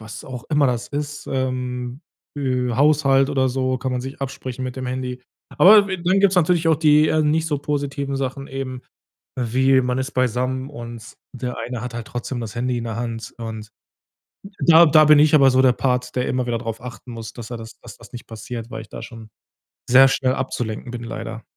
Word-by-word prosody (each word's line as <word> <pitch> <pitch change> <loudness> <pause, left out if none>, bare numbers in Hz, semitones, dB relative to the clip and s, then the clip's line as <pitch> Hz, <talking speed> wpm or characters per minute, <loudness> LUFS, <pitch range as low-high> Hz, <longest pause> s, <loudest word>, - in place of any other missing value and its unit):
was 110 -1 -9
auch 125 -3 -8
immer 150 -2 +3
das 120 -1 -2
ist, 145 0 -5
ähm, 125 -1 -3 0.4
äh, 125 -3 -1
Haushalt 140 0 +3
oder 130 -2 +1
so 130 0 -1
kann 130 -1 -3
man 125 - -1
sich 135 +2 -8
absprechen 130 -1 -5
mit 125 0 -5
dem 130 -1 -4
Handy. 125 0 -4 0.4
Aber 205 +2 +8
dann 185 +3 +1
gibt's 195 -2 +3
natürlich 170 -1 +3
auch 160 - +4
die 150 0 +4
eher 155 0 +2
nicht 155 +2 +1
so 150 -2 0
positiven 140 -1 -3
Sachen 135 +1 -4
eben, 130 -1 -5 0.5
wie, 130 +2 +3
man 125 0 -1
ist 130 +2 -3
beisammen 130 +1 -1
und 120 -3 -9 0.2
der 125 0 -5
eine 125 -2 -5
hat 125 -1 -6
halt 115 -2 -6
trotzdem 120 0 -5
das 110 -2 -6
Handy 125 +1 -1
in 115 - -5
der 115 -1 -4
Hand 115 -1 -5
und 110 -2 -7 1.0
da 170 0 +8
da 155 +1 +6
bin 150 -1 +7
ich 155 +1 +5
aber 135 -3 +6
so 130 0 +3
der 130 -2 +5
Part, 125 0 -1
der 125 - 0
immer 125 -1 -1
wieder 115 -1 -1
drauf 115 -2 -5
achten 125 0 -9
muss, 115 -1 -7
dass 120 -2 -9
er 120 - -4
das 110 0 -11
dass - - -11
das - - -16
nicht 120 - -9
passiert, 115 +1 -7
weil 110 - -6
ich 110 - -15
da - - -8
schon 115 -2 -11 0.6
sehr 135 +1 +8
schnell 130 -1 +1
abzulenken 120 -3 -4
bin, 120 -1 -6
leider. 115 0 -6
130 Hz, 210 wpm, -21 LUFS, 120-140 Hz, 1.0 s, Aber